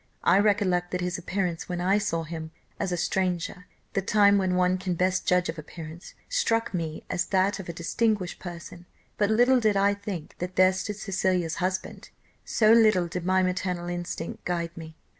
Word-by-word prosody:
I 195 - +5
recollect 195 -4 +2
that 180 0 -2
his 180 0 -2
appearance 180 -2 -3
when 175 -1 -2
I 190 +3 +2
saw 165 -5 -1
him 160 0 -6 0.3
as 195 -3 -1
a 175 - 0
stranger 180 0 -1 0.3
the 195 - +1
time 200 0 +4
when 185 -1 +1
one 180 0 +2
can 185 -1 -2
best 185 +2 0
judge 180 0 +3
of 165 0 -4
appearance 160 +2 -10
struck 230 - 0
me 160 -3 -3
as 185 +1 -1
that 195 +1 +1
of 185 - -7
a - - -3
distinguished 190 +2 -1
person; 175 0 -9 0.3
but 205 -1 +3
little 245 +4 +4
did 215 -3 +2
I 200 +1 +4
think 200 -6 -7
that 180 +1 -4
there 185 0 +5
stood 200 +2 -4
Cecilia's 185 -4 -1
husband! 185 +2 -3 0.3
so 215 0 +4
little 215 -6 +5
did 175 +1 -5
my 185 0 +3
maternal 180 -1 -2
instinct 175 -1 -5
guide 170 -1 -2
me. 160 -1 -9
185 Hz, 185 wpm, -27 LUFS, 175-200 Hz, 0.3 s, I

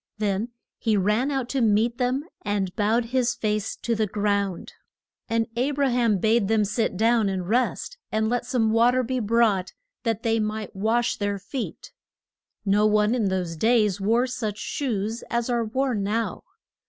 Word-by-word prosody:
Then 210 +2 -1 0.3
he 220 -3 +1
ran 210 +7 +1
out 270 -4 -1
to 270 - 0
meet 225 +3 +2
them, 255 +3 0 0.2
and 200 -3 -2
bowed 225 +3 +2
his 250 -2 +2
face 215 -1 -1
to 235 - -2
the 215 -1 0
ground. 200 -2 -1 0.6
And 230 0 +1
A 250 +4 +1
bra 285 -1 +1
ham 235 -4 +2
bade 220 +2 +2
them 215 -1 +2
sit 210 -2 -1
down 225 -1 +3
and 185 -2 -3
rest, 255 - -1
and 220 0 +1
let 245 +2 0
some 225 -4 +1
wa 230 +2 +5
ter 255 +1 +1
be 255 +2 -1
brought 215 -4 +2 0.3
that 225 -2 -2
they 225 -1 +2
might 215 -1 -3
wash 225 +4 +1
their 205 -1 -1
feet. 225 +6 -6 0.7
No 205 +2 +4
one 210 +1 +3
in 240 -4 +1
those 185 -3 -1
days 210 0 +2
wore 230 +5 +3
such 235 -5 -3
shoes 225 -2 -3
as 235 +1 -1
are 235 -1 +1
worn 250 -1 -1
now. 210 0 -2
220 Hz, 175 wpm, -25 LUFS, 205-240 Hz, 0.7 s, wa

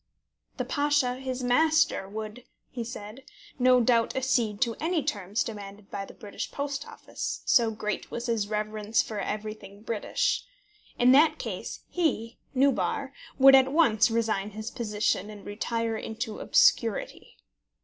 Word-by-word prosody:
"The - - -2
Pasha, 285 -4 +1
his 260 -1 -4
master, 310 -4 +2
would," 215 +3 -7 0.3
he 240 - -4
said, 225 +1 -8 0.4
"no 255 0 +5
doubt 235 -1 +2
accede 245 -5 0
to 235 -3 +2
any 325 -1 0
terms 205 -6 -1
demanded 205 -2 -9
by 195 0 -4
the - - -14
British 205 -2 -6
Post 285 0 -4
Office, - - -6
so 235 -2 +4
great 210 -2 -4
was 235 - -5
his 225 -4 0
reverence 215 +1 0
for 215 -2 -5
everything 210 -1 -6
British. 235 - -1 0.5
In 245 +1 +5
that 305 +3 +5
case - - -5
he, 255 -10 -1 0.2
Nubar, 275 +1 +1 0.2
would 270 0 +8
at 265 0 +6
once 235 -10 +4
resign 220 -3 0
his 215 +2 -6
position, 210 -3 -1
and 210 -1 -11
retire 230 +2 -2
into 220 +1 -5
obscurity. - - +2
230 Hz, 140 wpm, -27 LUFS, 210-265 Hz, 0.5 s, would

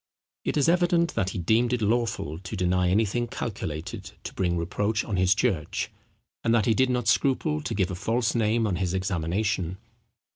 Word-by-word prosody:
It - - -1
is 145 - +3
evident 175 0 +3
that 95 - 0
he 100 - -5
deemed 110 +8 +2
it 125 - 0
lawful 110 -8 0
to 95 +3 -7
deny 90 -1 +2
anything 110 +5 +1
calculated 85 -10 -5
to - - -6
bring 90 -2 0
reproach 105 +6 -1
on 105 - -2
his 95 +1 +4
church; 80 -6 -1 0.5
and 115 0 +3
that 110 -4 +3
he 115 - +4
did 130 +3 +2
not 125 -2 0
scruple 100 - +2
to 75 - -3
give 95 -2 +1
a - - -3
false 115 +6 0
name 115 0 +2
on 95 -5 0
his 95 -1 -1
examination. 95 0 -1
105 Hz, 185 wpm, -26 LUFS, 90-115 Hz, 0.5 s, his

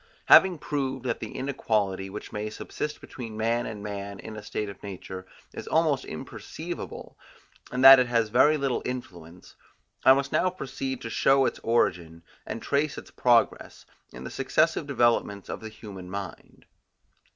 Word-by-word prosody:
Having 185 -3 +7
proved 135 -4 -3
that 120 - -1
the 110 - -7
inequality, 105 -8 -1
which 105 +2 -8
may 105 +1 -3
subsist 150 +7 -5
between 115 -4 -8
man 115 +2 0
and 105 -2 -7
man 100 -1 -6
in 110 - -8
a 110 - -7
state 105 0 -4
of 100 -2 -10
nature, 95 -1 -8 0.3
is - - -8
almost 155 -4 +2
imperceivable, 80 - -7 0.6
and 125 +1 -1
that 135 0 +11
it 125 - +2
has 115 -2 +1
very 140 +7 +5
little 135 -3 -1
influence, 90 -9 -8 0.5
I 130 - +8
must 140 0 -2
now 185 - +2
proceed 135 -6 -5
to 115 - -5
show 135 +3 +4
its - - -2
origin, 85 -8 0 0.2
and 115 - -5
trace 145 +1 0
its - - -10
progress, 120 -2 +1 0.3
in 60 - -10
the - - -7
successive - - +1
developments 115 -4 +1
of - - -5
the 110 - -7
human 100 -4 -10
mind. 100 0 -8
115 Hz, 160 wpm, -27 LUFS, 100-130 Hz, 0.6 s, that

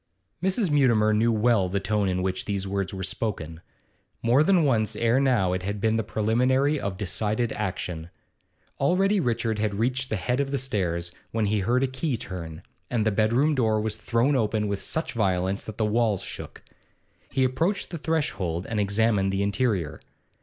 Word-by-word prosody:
Mrs. 190 0 +1
Mutimer 115 -7 +4
knew 115 +2 +3
well 110 -4 +2
the 100 +2 0
tone 100 0 0
in 90 0 -1
which 95 0 -2
these 100 -2 -2
words 100 -1 -2
were 95 -1 -5
spoken; 85 -5 -4 0.6
more 120 +4 +4
than 175 +1 +4
once 110 -6 +1
ere 115 +3 +2
now 120 -10 +2
it 95 - -2
had 100 +2 -3
been 110 +2 +1
the 110 - 0
preliminary 130 +8 +1
of 100 -5 -3
decided 110 +3 -1
action. 90 -5 -4 0.7
Already 195 +8 +3
Richard 115 - 0
had 105 -1 0
reached 130 +5 -1
the - - 0
head 125 +6 -1
of 140 -1 0
the 140 - -1
stairs, 90 -10 -2 0.2
when 110 -1 0
he 105 +1 +1
heard 120 +7 +1
a - - +2
key 130 0 -2
turn, 85 -6 -7 0.3
and 115 -3 0
the 110 - +3
bedroom 115 +9 +2
door 110 -5 +2
was 105 0 -1
thrown 115 +5 +1
open 110 -3 +1
with 100 -1 -2
such 160 - -2
violence 95 -3 0
that 110 - -8
the 110 - +1
walls 105 -2 +1
shook. - - -8 0.7
He 130 - +1
approached 165 +10 0
the 170 - -5
threshold 100 - -1
and 110 -2 -2
examined 100 -1 +2
the 95 +1 0
interior. 100 - -1
110 Hz, 180 wpm, -26 LUFS, 100-130 Hz, 0.7 s, Mutimer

